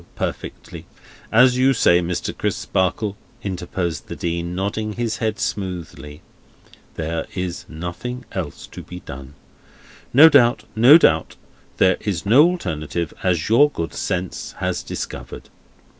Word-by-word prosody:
Perfectly. - - -6 0.4
As 125 +2 +5
you 135 +1 +4
say, 85 -7 +4
Mr. 90 0 -3
Crisparkle," 95 +2 -1 0.3
interposed 90 -3 -4
the - - -6
Dean, 85 +1 -3
nodding 105 +3 -2
his 115 0 -2
head 110 -2 -1
smoothly, 85 -6 -5 0.7
"there 80 0 -3
is 90 -2 -4
nothing 90 +10 -6
else 85 -7 -5
to - - -10
be 90 0 -10
done. 65 +2 -10 0.8
No 145 +6 +9
doubt, 125 -6 +4
no 125 +8 +8
doubt. 80 - +2 0.4
There 95 - +4
is 95 -6 -3
no 125 +10 +6
alternative, 85 - -3
as 90 -4 0
your 130 +7 +5
good 85 - -5
sense 90 0 -3
has - - -2
discovered." - - -7
95 Hz, 130 wpm, -21 LUFS, 85-115 Hz, 0.8 s, No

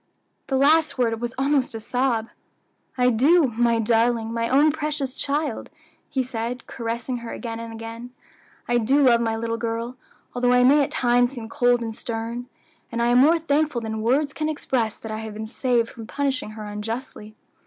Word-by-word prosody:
The 265 - 0
last 310 +3 +4
word 230 -2 0
was 240 0 -3
almost 270 -3 +1
a - - -4
sob. 235 -1 0 0.7
"I 250 0 +4
do, 280 +6 +4
my 235 0 +3
darling, 230 0 +1
my 230 0 -1
own 290 +4 +5
precious 300 -3 -3
child," 285 -3 -2 0.4
he 265 - 0
said, 245 0 -4
caressing 235 +1 -4
her 235 -1 -7
again 230 -2 -5
and 230 0 -7
again. 225 +2 -8 0.6
"I 240 0 +2
do 270 +6 +3
love 235 -3 +5
my 225 -1 0
little 230 0 -2
girl, 230 +2 -3 0.4
although 245 0 +2
I 250 0 +5
may 285 +4 +6
at - - -2
times 245 +1 +2
seem 230 -4 -7
cold 245 -2 +2
and 225 -1 -4
stern; 230 +2 -5 0.4
and 235 - -3
I 235 0 +2
am 245 +1 +5
more 315 +6 +6
thankful 300 -4 0
than 220 -1 -4
words 275 +6 +1
can 310 0 -2
express 245 -7 -1
that 220 - -8
I 215 - -3
have 220 -1 -7
been 220 +1 -5
saved 240 0 0
from 225 -2 -10
punishing 265 -5 -2
her 215 - -6
unjustly. 215 +1 -6
240 Hz, 185 wpm, -24 LUFS, 225-270 Hz, 0.7 s, may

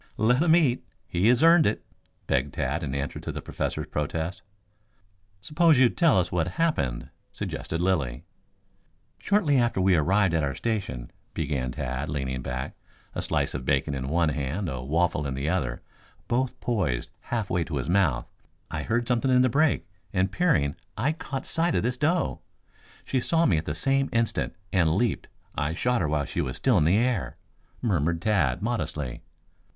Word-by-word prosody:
"Let 125 +5 +3
him 165 -1 +5
eat. 140 -8 +2 0.2
He 90 +5 +1
has 125 +4 +4
earned 165 -1 +7
it," 105 - -2 0.4
begged 70 +3 0
Tad 70 +3 -1
in 70 -4 -3
answer 70 0 -3
to - - -5
the - - -5
Professor's - - -3
protest. 80 +4 -3 1.0
"Suppose 155 - +3
you 130 -2 +6
tell 155 - +3
us 90 - -1
what 85 -2 0
happened," 75 - 0 0.2
suggested 85 +1 -4
Lilly. 70 -8 0 1.0
"Shortly 170 -10 +2
after 120 -5 +1
we 95 0 +4
arrived 95 +3 +3
at 80 -2 +1
our 70 -1 -1
station," 95 - -3 0.2
began 70 -5 -1
Tad, 65 +4 -3
leaning 65 -4 -2
back, 65 +1 -4 0.4
a - - -3
slice - - -1
of 65 - -4
bacon 70 +2 +1
in 65 -1 -3
one 85 +1 +2
hand, 75 +6 -2
a 65 -3 -4
waffle 75 +1 0
in 65 - -3
the 70 +2 -3
other, 75 -9 -1 0.4
both 125 +2 -1
poised 90 - -1
half 115 -5 -3
way 90 -1 +1
to 80 - -4
his 65 0 -3
mouth, 85 -10 +2 0.4
"I - - -2
heard 120 +1 -1
something 125 +1 +1
in 125 0 +5
the 130 - +3
brake, 150 +4 +2 0.2
and 95 -1 +1
peering, 135 - +2 0.2
I 130 +8 +1
caught 135 -4 -5
sight 170 +1 0
of - - +1
this 125 +2 0
doe. 165 +6 0 0.6
She 130 - 0
saw 165 +6 +2
me 85 - +3
at 80 - -7
the 75 - -3
same 135 +7 +2
instant, 115 -1 0 0.2
and 85 -4 +3
leaped. 120 +3 0 0.3
I 75 +3 -1
shot 125 +5 +1
her 75 - 0
while 75 -2 0
she - - -2
was 65 - -3
still 125 -8 +3
in 75 - +3
the 90 +6 +4
air," 120 -4 0 0.5
murmured 85 - +1
Tad 90 - +1
modestly. 80 - -3
90 Hz, 180 wpm, -26 LUFS, -, 1.0 s, earned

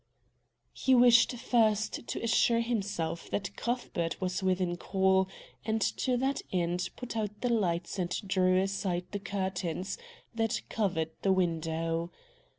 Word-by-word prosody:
He 265 - +3
wished 240 -1 +6
first 225 -3 +1
to - - -4
assure 230 0 +3
himself 200 -8 -2
that 195 0 -3
Cuthbert 215 -9 -2
was 185 0 -1
within 185 -2 +1
call, 190 +1 +2 0.4
and 220 0 0
to 250 +5 0
that 265 +2 0
end 175 0 0
put 250 -2 -7
out 210 -2 -3
the 245 - +1
lights 175 -4 0
and 175 -1 0 0.2
drew 185 -1 +3
aside 190 -2 -1
the 205 - -3
curtains 190 - -3 0.3
that 225 -1 0
covered 175 -7 0
the 195 - +2
window. 165 -1 0
190 Hz, 135 wpm, -30 LUFS, 175-225 Hz, 0.4 s, wished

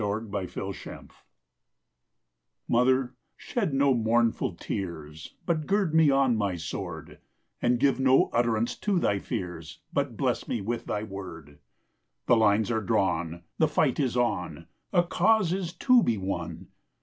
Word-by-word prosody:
THE 105 - -1
YOUNG 105 +1 -3
WARRIOR 95 -1 -6 1.6
Mother, 125 +1 +2 0.2
shed 210 -10 -2
no 135 0 +3
mournful 115 0 +1
tears, 80 -5 -6
But 160 -3 -1
gird 195 -5 +1
me 160 -2 +5
on 135 -3 +3
my 100 -4 -1
sword; 85 -1 -6 0.4
And 120 0 +2
give 135 0 +2
no 130 0 +4
utterance 120 0 +1
to 205 -3 0
thy 100 - +1
fears, 85 -5 -6 0.2
But - - -1
bless - - -1
me 120 - -2
with 115 +4 -3
thy 105 - -2
word. 90 -8 -9 0.7
The 125 - +5
lines 110 0 +3
are 110 -1 0
drawn! 85 -4 -1 0.2
The 160 - +4
fight 150 -2 +1
is 130 -4 0
on! 90 -9 -1 0.3
A 175 -3 +4
cause 190 0 +2
is 185 -3 -3
to 250 +7 +4
be 115 - +1
won! 95 0 -5
115 Hz, 145 wpm, -27 LUFS, 95-135 Hz, 1.6 s, me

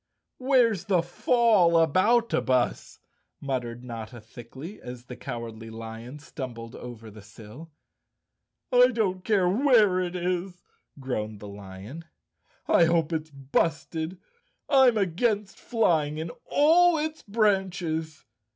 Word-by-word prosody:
"Where's 250 -7 +2
the 180 -4 +2
Fallaboutabus?" 180 - +2 0.4
muttered 125 -3 -4
Notta 120 0 -8
thickly, 120 - -11
as 125 0 -9
the 125 - -9
Cowardly 115 -2 -7
Lion 115 +4 -8
stumbled 125 -5 -8
over 115 -3 -9
the 105 +1 -13
sill. 110 +9 -13 1.0
"I 250 0 +7
don't 205 -7 -1
care 195 -4 +2
where 215 -3 +4
it 180 -1 -3
is," 180 0 -3 0.4
groaned 110 -5 -4
the 105 - -9
lion. 100 - -10 0.6
"I 170 - +5
hope 165 -1 +1
it's 160 0 -3
busted. 160 +4 -2 0.5
I'm 265 -5 +5
against 200 +2 -1
flying 160 -10 +1
in 160 +1 -4
all 330 +3 +4
its 310 +1 -3
branches." 185 -7 -1
165 Hz, 110 wpm, -26 LUFS, 125-205 Hz, 1.0 s, I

